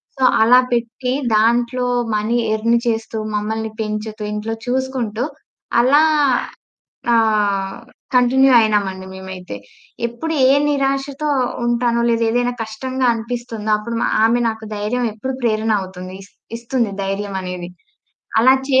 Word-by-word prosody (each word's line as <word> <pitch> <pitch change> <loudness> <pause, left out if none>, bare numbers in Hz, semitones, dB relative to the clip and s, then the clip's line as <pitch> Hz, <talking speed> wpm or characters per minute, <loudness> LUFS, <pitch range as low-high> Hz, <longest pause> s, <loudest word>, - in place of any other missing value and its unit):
So, 265 - -3 0.2
అలా 245 +3 +7
పెట్టి 240 +2 -1 0.2
దాంట్లో 240 +3 +2 0.3
మనీ 220 +3 0 0.2
ఎర్న్ 230 +2 +2
చేస్తూ, 225 -1 -2 0.2
మమ్మల్ని 220 +1 -2
పెంచుతూ, 215 0 -4
ఇంట్లో 210 +2 -3
చూసుకుంటూ 250 -3 -1 0.6
అలా 280 +5 +5 1.1
ఆహ్, 205 -3 +1 0.4
కంటిన్యూ 260 +2 +5
అయినాం 210 -2 +2
అండి 190 0 -9
మేమైతే. 190 - -8 0.5
ఎప్పుడు 240 +8 -4 0.2
ఏ 270 - +6 0.2
నిరాశతో 275 +1 -1 0.4
ఉంటానో 235 0 +1
లేదా 230 0 +2
ఏదైనా 245 +1 +1
కష్టంగా 255 +4 -3
అనిపిస్తుందో 230 -2 -4
అప్పుడు 230 +2 -5
మా - - +2 0.2
ఆమె 235 +2 +2
నాకు 220 0 -7
ధైర్యం 220 +4 -1
ఎప్పుడు 260 +5 -4
ప్రేరణ 220 -1 +1
అవుతుంది, 185 0 -8
ఇస్ - - -19 0.2
ఇస్తుంది 235 -3 -1
ధైర్యమానేది. 190 -3 -4 0.7
అలా 260 +3 +6
చే 260 -1 +4
225 Hz, 120 wpm, -19 LUFS, 210-250 Hz, 1.1 s, అలా